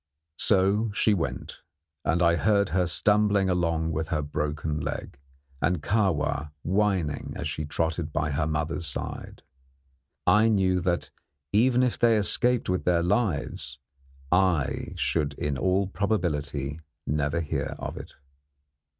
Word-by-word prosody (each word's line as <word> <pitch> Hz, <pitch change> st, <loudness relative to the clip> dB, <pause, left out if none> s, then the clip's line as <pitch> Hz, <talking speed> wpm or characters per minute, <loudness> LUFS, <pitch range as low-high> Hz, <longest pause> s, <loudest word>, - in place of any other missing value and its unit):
So 100 Hz, +2 st, +3 dB
she 110 Hz, -, +3 dB
went, 85 Hz, -5 st, -3 dB, 0.4 s
and 85 Hz, +4 st, +1 dB
I 85 Hz, 0 st, +4 dB
heard 100 Hz, 0 st, +2 dB
her 90 Hz, -2 st, +1 dB
stumbling 105 Hz, +1 st, +3 dB
along 85 Hz, -2 st, 0 dB
with 80 Hz, 0 st, -2 dB
her 75 Hz, -3 st, -1 dB
broken 75 Hz, +1 st, -2 dB
leg, 70 Hz, -, -5 dB, 0.4 s
and 90 Hz, -4 st, 0 dB
Kahwa 90 Hz, -8 st, 0 dB
whining 95 Hz, -5 st, 0 dB
as -, -, -3 dB
she 75 Hz, 0 st, -3 dB
trotted 80 Hz, +1 st, -2 dB
by 75 Hz, 0 st, -1 dB
her 75 Hz, +2 st, 0 dB
mother's 80 Hz, +2 st, -2 dB
side. 70 Hz, -, -5 dB, 0.8 s
I 110 Hz, +2 st, +5 dB
knew 95 Hz, -4 st, +2 dB
that, 85 Hz, 0 st, -1 dB, 0.4 s
even 125 Hz, +4 st, +4 dB
if 125 Hz, -, 0 dB
they 115 Hz, -2 st, +4 dB
escaped 120 Hz, +4 st, +1 dB
with 90 Hz, 0 st, 0 dB
their 85 Hz, -1 st, +2 dB
lives, 85 Hz, -, -1 dB, 0.5 s
I 90 Hz, -6 st, +1 dB
should 75 Hz, -3 st, -1 dB
in 75 Hz, 0 st, -2 dB
all 95 Hz, +7 st, +1 dB
probability 80 Hz, -8 st, -2 dB, 0.3 s
never 75 Hz, +3 st, 0 dB
hear 80 Hz, -3 st, -3 dB
of -, -, -5 dB
it. -, -, -10 dB
85 Hz, 135 wpm, -26 LUFS, 75-100 Hz, 0.8 s, I